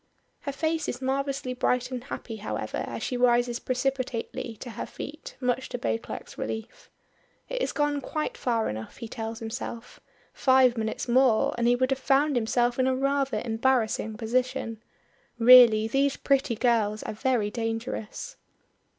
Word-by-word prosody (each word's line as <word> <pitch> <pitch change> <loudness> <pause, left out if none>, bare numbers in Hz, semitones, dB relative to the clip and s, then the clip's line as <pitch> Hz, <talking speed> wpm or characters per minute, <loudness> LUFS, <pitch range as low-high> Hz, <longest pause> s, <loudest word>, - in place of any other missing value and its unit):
Her 280 - -4
face 315 +2 -1
is 245 - -4
marvelously 270 0 -2
bright 250 0 0
and 250 -1 -4
happy, 230 -3 -6
however, 210 - -3
as - - -5
she 250 - -2
rises 240 -1 +3
precipitately 255 -3 -2
to 245 - -6
her 220 - -5
feet, 310 +2 -8
much 250 0 -1
to - - -3
Beauclerk's 230 -1 -4
relief. 225 - -6 0.6
It - - -3
has - - 0
gone 295 -1 0
quite 310 - -3
far 235 - 0
enough 110 +1 -6
he 230 - -6
tells 225 0 -5
himself 230 +1 -6 0.3
five 260 -2 +4
minutes 220 +1 -3
more 245 -2 +4
and 235 0 +1
he 245 - +5
would 255 +2 +1
have 270 - +1
found 275 +2 +2
himself 240 +1 +1
in 260 - +3
a 260 - +2
rather 275 0 0
embarrassing 225 -2 0
position. 240 -1 -1 0.6
Really 230 -2 +8
these 275 +4 +1
pretty 275 -3 +1
girls 215 -3 +1
are - - -4
very 220 -2 0
dangerous. 225 - -4
250 Hz, 155 wpm, -27 LUFS, 225-270 Hz, 0.6 s, Really